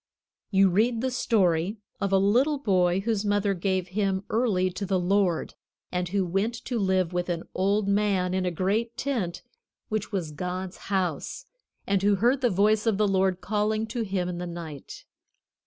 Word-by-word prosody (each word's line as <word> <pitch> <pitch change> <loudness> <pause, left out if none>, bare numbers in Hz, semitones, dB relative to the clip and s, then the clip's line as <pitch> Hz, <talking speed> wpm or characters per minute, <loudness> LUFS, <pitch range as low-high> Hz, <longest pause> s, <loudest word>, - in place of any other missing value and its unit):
You 195 -2 +4
read 225 +5 +2
the 260 0 -1
story 195 -6 +1 0.2
of 200 -1 -1
a 195 - +5
little 245 +10 +3
boy 185 -7 +2
whose 215 -1 -1
mother 205 -1 +1
gave 185 0 -1
him 195 0 0
early 205 -6 +1
to 180 +3 -5
the 190 -1 +1
Lord, 180 -1 +1 0.4
and 180 -1 -2
who 195 0 0
went 195 +7 0
to 240 -2 -2
live 190 -3 +1
with 180 0 -1
an 170 -1 -2
old 200 +2 +1
man 200 -3 +1
in 190 0 0
a 180 - +1
great 205 +7 -1
tent, 230 -12 -2 0.5
which 215 -1 -2
was 180 -7 -2
God's 180 +4 -4
house, 185 -7 -2 0.4
and 195 -1 +1
who 205 +1 +3
heard 245 +7 +2
the 245 - +3
voice 210 +3 +2
of 215 -3 +2
the 210 0 +3
Lord 190 -1 +1
calling 215 +3 0
to 235 +1 -3
him 190 -4 -1
in 175 -1 -4
the 180 - -4
night. 165 -5 -8
195 Hz, 180 wpm, -26 LUFS, 180-215 Hz, 0.5 s, a